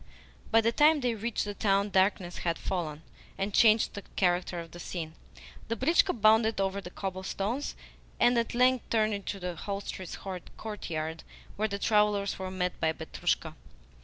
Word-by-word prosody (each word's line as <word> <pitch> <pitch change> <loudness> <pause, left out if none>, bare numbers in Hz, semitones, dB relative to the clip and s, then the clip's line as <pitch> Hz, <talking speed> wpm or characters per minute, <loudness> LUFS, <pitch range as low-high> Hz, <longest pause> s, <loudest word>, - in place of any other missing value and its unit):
By 225 - +5
the 230 +1 +2
time 300 +4 +5
they 245 -2 +1
reached 225 +1 -2
the 205 - -4
town 200 0 +1
darkness 190 -2 +1
had 170 -1 -1
fallen, 160 -5 -3 0.3
and 195 +1 -2
changed 220 +1 +5
the 200 - -6
character 180 -1 +1
of 165 -1 -8
the 175 - -10
scene. 165 -2 -5 0.5
The 230 - -1
britchka 330 - +3
bounded 220 0 +4
over 195 0 0
the 180 - -8
cobblestones, 195 +7 -3 0.4
and 245 - +5
at 230 0 -2
length 255 0 +3
turned 215 -1 +2
into 200 0 -4
the 180 -1 -3
hostelry's 195 -1 -5 0.4
courtyard, 165 -7 -4 0.3
where 215 +1 0
the 200 -1 -3
travellers 210 -1 +2
were 190 0 -3
met 180 -1 -2
by 160 - +1
Petrushka. 160 0 -2
200 Hz, 160 wpm, -29 LUFS, 180-220 Hz, 0.5 s, By